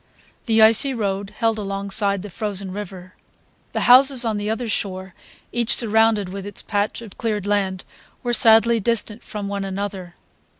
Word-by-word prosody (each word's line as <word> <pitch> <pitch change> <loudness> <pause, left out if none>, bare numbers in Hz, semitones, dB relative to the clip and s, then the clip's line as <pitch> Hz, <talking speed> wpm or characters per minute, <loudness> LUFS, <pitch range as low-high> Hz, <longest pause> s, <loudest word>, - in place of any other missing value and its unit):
The 225 -1 +4
icy 230 +5 +5
road 200 -3 -3
held 225 -1 0
alongside 200 0 -2
the 205 - -9
frozen 200 -2 -5
river. 185 -2 -9 0.6
The - - -3
houses 255 0 +5
on 220 -2 -1
the 205 +1 -4
other 225 +2 -3
shore, 190 -3 -4 0.4
each 235 -1 +1
surrounded 220 -3 +4
with 195 +1 -7
its 205 0 -7
patch 205 +2 -3
of 215 - -14
cleared 210 -4 -2
land, 195 -3 -1 0.4
were 240 -1 -2
sadly 230 0 +5
distant 220 0 -1
from 205 -1 -7
one 200 0 -4
another. 195 -2 -6
205 Hz, 160 wpm, -21 LUFS, 195-225 Hz, 0.6 s, icy